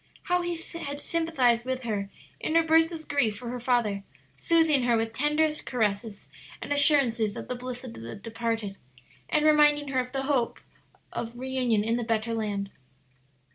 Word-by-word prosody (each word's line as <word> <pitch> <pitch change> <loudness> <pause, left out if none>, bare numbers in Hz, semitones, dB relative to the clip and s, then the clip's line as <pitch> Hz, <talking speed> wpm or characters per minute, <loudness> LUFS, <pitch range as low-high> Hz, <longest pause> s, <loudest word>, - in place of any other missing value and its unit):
How 360 -1 +1
he 345 -1 -2 0.3
had 285 0 -4
sympathized 290 -8 +1
with 260 0 -3
her 205 -4 -2 0.3
in 315 - -2
her 330 - +6
bursts 325 +1 +4
of 320 -2 -7
grief 245 -8 +1
for 240 +1 -7
her 250 +1 -4
father, 235 -5 +1 0.3
soothing 325 -4 +3
her 240 -1 +2
with 225 0 -2
tenderest 300 +3 +1
caresses 210 -3 -1 0.3
and - - -2
assurances 250 -8 +3
of - - -6
the - - -2
bliss 250 0 -6
of 245 -3 -8
the 115 +1 -8
departed, 225 -1 -3 0.5
and 305 0 +2
reminding 295 -1 +5
her 260 -1 +1
of 250 - -1
the - - -28
blessed 270 0 -1
hope 250 -4 +1 0.5
of 235 +1 -5
reunion 250 -4 0
in 225 +2 0
the 240 - -2
better 225 0 -1
land. 205 -3 -2
250 Hz, 175 wpm, -27 LUFS, 225-295 Hz, 0.5 s, her